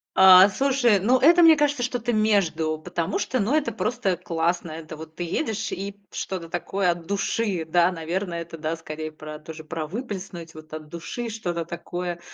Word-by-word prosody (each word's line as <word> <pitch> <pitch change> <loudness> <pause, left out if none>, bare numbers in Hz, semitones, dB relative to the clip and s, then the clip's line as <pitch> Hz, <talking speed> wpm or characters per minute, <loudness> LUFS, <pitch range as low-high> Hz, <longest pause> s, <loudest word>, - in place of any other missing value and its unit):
А, 190 0 +9
слушай, 255 -3 +2
ну, 240 +7 +3
это, 330 +7 +6
мне 325 -1 +8
кажется, 290 -3 +1
что-то 240 -1 -1
между, 195 -7 +1
потому 165 +1 -3
что, 255 - -1
ну, 220 +9 +1
это 295 -6 +1
просто 220 -2 -1
классно, 170 0 -1
это 155 0 -8
вот 160 0 -11
ты 175 - -4
едешь 220 - -2
и 200 +2 -5 0.2
что-то 175 -4 -5
такое 180 +1 0
от 170 -1 -6
души, 200 -2 -1
да, 175 +2 +3
наверное, 170 +1 -3
это, 165 -1 -11
да, 155 +1 -2
скорее 155 -1 -6
про 155 0 -9
тоже, 160 0 -9
про 155 -1 -5
выплеснуть 190 -6 -6
вот 155 0 -13
от 155 -1 -7
души 170 +9 -5
что-то 175 -7 -3
такое, 175 +1 -5
180 Hz, 180 wpm, -24 LUFS, 165-220 Hz, 0.2 s, А